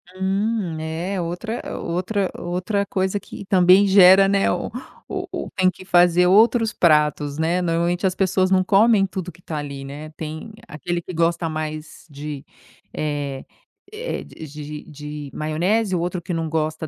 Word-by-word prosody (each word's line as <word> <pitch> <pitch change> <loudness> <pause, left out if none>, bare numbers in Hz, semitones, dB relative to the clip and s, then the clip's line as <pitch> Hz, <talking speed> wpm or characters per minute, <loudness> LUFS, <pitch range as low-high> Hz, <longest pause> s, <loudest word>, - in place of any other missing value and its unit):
Hum, 195 -1 -1
é 170 +4 -3
outra 180 +7 -4 0.2
outra 185 +3 -2
outra 185 +4 -2
coisa 190 0 -1
que 200 - -10
também 185 +1 +5
gera, 195 0 +7
né, 195 0 +2
o - - -3 0.4
o - - -4
o - - -5
tem 185 -1 +3
que 185 +1 -9
fazer 175 0 +4
outros 225 +3 +4
pratos, 150 -3 +2
né. 170 +3 +1
Normalmente, 175 +2 0
as 185 - -2
pessoas 185 -1 +1
não 185 -1 +3
comem 205 +1 +4
tudo 185 -2 -5
que 175 - -21
tá 155 -3 -5
ali, 140 -2 -6
né. 145 +3 -8
Tem 155 +7 -7 0.2
aquele 175 +3 -4
que 180 - -8
gosta 165 0 +1
mais 155 0 -6
de 145 0 -7 0.5
eh-eh, 150 - -6
d 160 - -11
de 150 +1 -9 0.2
de - - -14
de 150 -1 -8
maionese, 180 +7 0
o - - 0
outro 175 +1 -2
que 175 - -5
não 165 -1 -2
gosta 155 0 -2
175 Hz, 165 wpm, -22 LUFS, 155-195 Hz, 0.5 s, gera